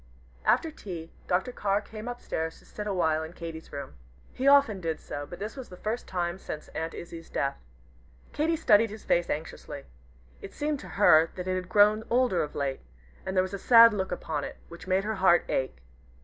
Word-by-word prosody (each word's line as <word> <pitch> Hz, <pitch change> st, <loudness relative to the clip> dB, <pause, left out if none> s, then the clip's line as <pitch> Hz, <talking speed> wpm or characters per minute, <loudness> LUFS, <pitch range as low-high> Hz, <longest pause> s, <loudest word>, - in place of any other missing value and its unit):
After 325 Hz, -, +3 dB
tea, 175 Hz, -, -8 dB, 0.2 s
Dr. 190 Hz, +8 st, +1 dB
Carr 200 Hz, -4 st, 0 dB
came 215 Hz, +2 st, -9 dB
up 245 Hz, 0 st, -5 dB
stairs 160 Hz, 0 st, -3 dB
to -, -, -20 dB
sit 210 Hz, 0 st, -7 dB
a 200 Hz, -, -1 dB
while 160 Hz, -3 st, +2 dB
in 160 Hz, +1 st, -7 dB
Katy's 165 Hz, -2 st, -8 dB
room. 140 Hz, -, -6 dB, 0.4 s
He 265 Hz, -, -1 dB
often 275 Hz, -9 st, +5 dB
did 165 Hz, -2 st, -2 dB
so, 145 Hz, 0 st, -6 dB
but 175 Hz, -, -8 dB
this 210 Hz, +6 st, -5 dB
was 265 Hz, -3 st, -8 dB
the 180 Hz, -, -11 dB
first 220 Hz, +5 st, -3 dB
time 175 Hz, 0 st, -2 dB
since 155 Hz, -4 st, -7 dB
Aunt 160 Hz, +1 st, -4 dB
Izzie's 165 Hz, -1 st, -9 dB
death. 140 Hz, 0 st, -1 dB, 0.8 s
Katy 320 Hz, +2 st, +1 dB
studied 225 Hz, -8 st, +4 dB
his 215 Hz, +1 st, -9 dB
face 175 Hz, 0 st, +2 dB
anxiously. 155 Hz, +2 st, -5 dB, 0.6 s
It 195 Hz, -, -10 dB
seemed 295 Hz, -1 st, -1 dB
to -, -, -10 dB
her 165 Hz, -5 st, +6 dB
that 180 Hz, 0 st, -5 dB
it 185 Hz, -, 0 dB
had 185 Hz, -1 st, -3 dB
grown 210 Hz, +2 st, +5 dB
older 245 Hz, -6 st, +2 dB
of 150 Hz, -, -4 dB
late, 135 Hz, -2 st, -2 dB, 0.5 s
and 190 Hz, 0 st, -2 dB
there 185 Hz, -, +5 dB
was 185 Hz, +1 st, -6 dB
a 200 Hz, -, -3 dB
sad 230 Hz, +1 st, +8 dB
look 190 Hz, -2 st, -2 dB
upon 155 Hz, -4 st, -3 dB
it, -, -, -6 dB
which 170 Hz, +2 st, -11 dB
made 190 Hz, +1 st, +2 dB
her 215 Hz, 0 st, -2 dB
heart 175 Hz, -2 st, +5 dB
ache. 130 Hz, -, -1 dB
185 Hz, 210 wpm, -28 LUFS, 165-215 Hz, 0.8 s, sad